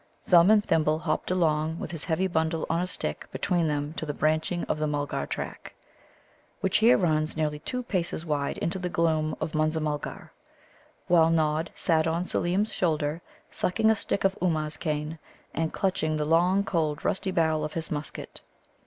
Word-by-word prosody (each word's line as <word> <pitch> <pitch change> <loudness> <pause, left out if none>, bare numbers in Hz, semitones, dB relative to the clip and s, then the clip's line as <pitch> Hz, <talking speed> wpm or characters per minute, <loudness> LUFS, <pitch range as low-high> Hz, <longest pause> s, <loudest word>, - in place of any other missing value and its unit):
Thumb 175 +1 +6
and 215 -1 +5
Thimble 155 -1 +2
hopped 155 -1 -2
along 160 -3 +1
with - - -5
his 165 -3 -4
heavy 180 +2 +1
bundle 160 -2 0
on 165 +1 +1
a 180 - -1
stick 75 - -4
between 175 -3 0
them 145 0 -2
to - - -2
the 145 - -3
branching 155 +3 0
of - - -2
the 155 - 0
Mulgar 145 -1 -2
track, - - -6 0.8
which 190 - +2
here 230 +3 +6
runs 155 -4 0
nearly 150 -1 -1
two 250 +10 -4
paces 175 -6 -2
wide 145 -3 -1
into 175 +3 -2
the 180 -1 -2
gloom 160 -3 +1
of 155 - -3
Munza 155 +1 +1
mulgar; 150 -1 -4 0.7
while 165 -2 +5
Nod 160 0 +1
sat 160 -1 +2
on 170 +2 0
Seelem's 190 +5 0
shoulder, 155 -2 0 0.3
sucking 220 +4 +2
a - - +3
stick 200 - -2
of 195 0 +2
Ummuz 155 -4 0
cane, 155 0 -3 0.3
and 160 -1 -1
clutching 160 -5 0
the 150 - -1
long, 175 +5 +3
cold, 155 -6 -1
rusty 190 0 0
barrel 160 -4 +1
of 150 - -4
his 165 -1 -4
musket. 150 -1 -5
160 Hz, 180 wpm, -27 LUFS, 155-180 Hz, 0.8 s, Thumb